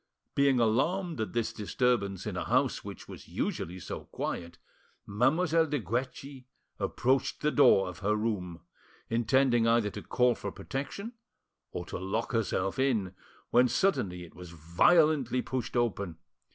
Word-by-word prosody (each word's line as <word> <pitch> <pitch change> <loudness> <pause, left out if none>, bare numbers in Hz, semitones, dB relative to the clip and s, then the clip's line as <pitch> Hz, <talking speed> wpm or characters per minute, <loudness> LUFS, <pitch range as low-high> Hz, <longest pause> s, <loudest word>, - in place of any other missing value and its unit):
Being 140 -2 +3
alarmed 150 - +1
at 105 -4 -3
this 120 -2 -1
disturbance 105 -3 0
in - - -4
a - - -3
house - - +1
which - - -9
was - - -11
usually 90 +3 -3
so - - -7
quiet, 85 0 -5 0.5
Mademoiselle 160 - +2
de 150 0 -1
Guerchi 130 +5 -4 0.3
approached 130 +1 0
the 150 - +2
door 95 -10 +5
of 90 - -8
her 105 +1 +1
room, 95 -6 -3 0.5
intending 120 +1 +3
either 115 -3 +3
to - - -7
call 125 -1 +2
for - - -6
protection 150 - -5 0.6
or 90 - -5
to - - -6
lock 95 +5 -2
herself 110 -2 -1
in, 110 -9 +1 0.4
when 125 +1 +5
suddenly 120 - 0
it 85 - -13
was 90 0 -10
violently 125 - +3
pushed 130 -1 -3
open. 100 -8 -1
120 Hz, 145 wpm, -30 LUFS, 100-135 Hz, 0.6 s, door